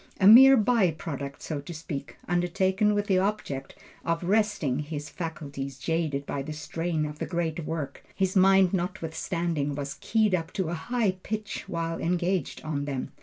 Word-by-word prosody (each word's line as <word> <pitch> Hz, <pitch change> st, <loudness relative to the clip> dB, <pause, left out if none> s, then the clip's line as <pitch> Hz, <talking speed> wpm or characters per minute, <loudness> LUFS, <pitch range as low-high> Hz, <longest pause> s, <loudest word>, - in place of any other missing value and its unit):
A 190 Hz, -, +3 dB
mere 265 Hz, +6 st, +10 dB
by 220 Hz, -4 st, +3 dB
product 140 Hz, -3 st, -6 dB
so 150 Hz, -3 st, -3 dB
to 165 Hz, +4 st, -8 dB
speak, 155 Hz, -3 st, -6 dB
undertaken 190 Hz, +4 st, +2 dB
with 205 Hz, 0 st, 0 dB
the 190 Hz, -2 st, +3 dB
object 185 Hz, -9 st, -2 dB, 0.3 s
of 165 Hz, +1 st, -1 dB
resting 190 Hz, -9 st, +1 dB
his 150 Hz, 0 st, -5 dB
faculties 140 Hz, -5 st, -5 dB
jaded 155 Hz, -2 st, -1 dB
by 140 Hz, -, -3 dB
the 155 Hz, +3 st, -5 dB
strain 160 Hz, +1 st, -2 dB
of 150 Hz, 0 st, -7 dB
the -, -, -3 dB
greater 170 Hz, -1 st, -2 dB
work, 150 Hz, -3 st, -5 dB
his 190 Hz, 0 st, 0 dB
mind 190 Hz, -1 st, +5 dB
notwithstanding 170 Hz, -4 st, -2 dB
was 140 Hz, -1 st, -5 dB
keyed 215 Hz, -3 st, +2 dB
up 165 Hz, -2 st, -1 dB
to 190 Hz, -5 st, -1 dB
a -, -, -2 dB
high 215 Hz, +5 st, 0 dB
pitch, 210 Hz, 0 st, -4 dB
while 165 Hz, -1 st, -2 dB
engaged 180 Hz, +2 st, -1 dB
on 145 Hz, -2 st, -2 dB
them. 135 Hz, -3 st, -4 dB
165 Hz, 170 wpm, -27 LUFS, 150-190 Hz, 0.3 s, mere